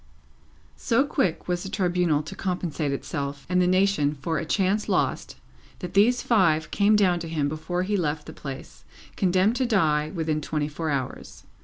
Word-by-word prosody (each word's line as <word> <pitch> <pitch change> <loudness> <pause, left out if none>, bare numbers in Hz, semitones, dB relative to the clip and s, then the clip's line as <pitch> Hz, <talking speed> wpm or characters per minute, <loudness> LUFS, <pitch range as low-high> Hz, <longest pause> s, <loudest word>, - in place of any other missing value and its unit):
So 260 +3 +2
quick 185 - -1
was 175 -1 -1
the 195 - -6
Tribunal 180 -6 +1
to 155 - -8
compensate 175 -5 -2
itself 140 0 -4
and 180 0 +2
the 180 - +3
nation 185 -6 +2
for 155 +3 -2
a 165 - -4
chance 195 +4 0
lost, - - 0 0.4
that 180 -1 -7
these 230 +5 +4
five 170 -9 +2
came 205 +1 +3
down 185 -4 +3
to 165 -1 -6
him 155 -3 0
before 160 +4 -3
he 205 +2 -1
left 150 -5 -1
the - - -9
place, 135 -2 -9 0.3
condemned 190 +5 +2
to 260 - +1
die 155 -9 +2
within 160 -3 -1
twenty 150 0 -2
four 155 +2 -4
hours. 135 -3 -4
175 Hz, 175 wpm, -25 LUFS, 150-195 Hz, 0.4 s, these